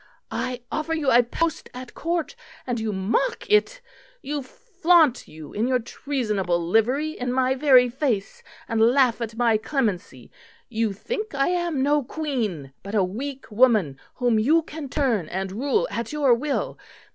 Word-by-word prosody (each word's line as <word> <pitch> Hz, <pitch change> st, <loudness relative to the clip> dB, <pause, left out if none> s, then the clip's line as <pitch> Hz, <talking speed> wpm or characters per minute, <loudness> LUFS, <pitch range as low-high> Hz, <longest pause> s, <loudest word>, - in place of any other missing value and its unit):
I 250 Hz, -1 st, -3 dB
offer 320 Hz, +1 st, -1 dB
you 295 Hz, -4 st, +1 dB
a 240 Hz, -, +7 dB
post 320 Hz, +7 st, -2 dB
at 250 Hz, 0 st, -9 dB
Court 335 Hz, -1 st, -2 dB, 0.3 s
and 245 Hz, -2 st, -2 dB
you 220 Hz, -1 st, -2 dB
mock 205 Hz, -, -1 dB
it; -, -, +3 dB, 0.4 s
you 290 Hz, 0 st, -3 dB
flaunt 345 Hz, -, +2 dB
you 155 Hz, -1 st, -11 dB
in 220 Hz, +4 st, 0 dB
your 255 Hz, -1 st, +3 dB
treasonable 220 Hz, -7 st, -2 dB
livery 230 Hz, -, +1 dB
in 250 Hz, -4 st, -4 dB
my 260 Hz, 0 st, +2 dB
very 260 Hz, -2 st, +5 dB
face, 245 Hz, -5 st, -2 dB, 0.3 s
and 225 Hz, -1 st, 0 dB
laugh 245 Hz, 0 st, +4 dB
at 225 Hz, -1 st, -5 dB
my 230 Hz, -2 st, +3 dB
clemency. 210 Hz, -, -3 dB, 0.4 s
You 225 Hz, -2 st, 0 dB
think 425 Hz, -, -5 dB
I 275 Hz, +3 st, +2 dB
am 345 Hz, -6 st, 0 dB
no 290 Hz, +1 st, +3 dB
Queen, 230 Hz, -, -3 dB
but 200 Hz, +3 st, -6 dB
a 200 Hz, -, +4 dB
weak 255 Hz, +7 st, -5 dB
woman 210 Hz, -, +3 dB, 0.2 s
whom 245 Hz, -3 st, +2 dB
you 310 Hz, +9 st, +3 dB
can 300 Hz, -3 st, -8 dB
turn 240 Hz, -, 0 dB
and 190 Hz, +1 st, -3 dB
rule 285 Hz, -, 0 dB
at 235 Hz, -, -4 dB
your 290 Hz, -4 st, +3 dB
will. 275 Hz, +4 st, -2 dB
250 Hz, 160 wpm, -24 LUFS, 220-295 Hz, 0.4 s, a